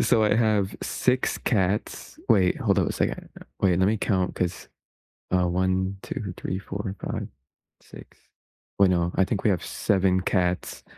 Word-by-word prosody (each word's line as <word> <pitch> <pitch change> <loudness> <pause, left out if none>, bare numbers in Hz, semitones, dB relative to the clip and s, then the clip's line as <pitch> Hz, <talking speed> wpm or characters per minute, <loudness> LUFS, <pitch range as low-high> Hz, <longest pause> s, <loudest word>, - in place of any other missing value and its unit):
so, 110 -3 +3
I 105 - +3
have 105 -4 +2
6 125 0 0
cats 100 -3 -1
wait, 95 -5 +4
hold - - +2
on - - +2
a - - -3
second. - - -2 0.3
Wait, 90 -2 +3
lemme 100 +4 +3
count 95 -3 0
'cause 90 -1 -3 0.7
uh, 90 -1 +3
1, 95 +2 0
2, 100 -5 -5
3, 95 - -3
4, 100 0 -5
5, - - -4 0.5
6 - - -14 0.6
wait, 100 - +6
no, 85 -1 +1
I 95 - +3
think 100 0 -2
we 105 - +3
have 90 -4 0
7 95 -2 +1
cats 90 -1 -1
95 Hz, 160 wpm, -25 LUFS, 90-105 Hz, 0.7 s, wait